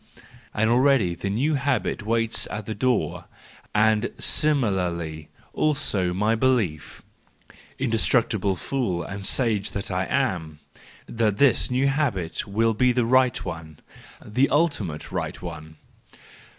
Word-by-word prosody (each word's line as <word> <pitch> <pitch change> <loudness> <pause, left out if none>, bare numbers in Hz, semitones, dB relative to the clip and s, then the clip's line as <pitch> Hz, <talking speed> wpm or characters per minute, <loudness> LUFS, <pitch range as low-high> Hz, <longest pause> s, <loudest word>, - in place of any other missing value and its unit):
And 110 +1 +1
already 120 -6 +3
the 100 +3 -4
new 130 +10 0
habit 140 -6 -1
waits 115 +1 0
at 105 0 -6
the 110 - -4
door, 125 0 -1 0.5
and 110 +1 +3
similarly 90 - 0 0.2
also 135 -12 0
my 105 +5 +1
belief—indestructible 115 - -1
fool 95 -6 -2
and 100 +2 -7
sage 105 -1 +1
that 100 - -5
I 90 +1 0
am 90 - -1 0.5
!—that 110 -3 0
this 140 -1 +3
new 130 +2 +1
habit 125 - -1
will 115 +3 +1
be 125 +3 +3
the 120 -1 +1
right 130 0 +2
one, 80 -4 -7 0.5
the 125 +6 +1
ultimate 125 - -1
right - - -4
one. 80 -2 -8
110 Hz, 120 wpm, -24 LUFS, 95-130 Hz, 0.5 s, already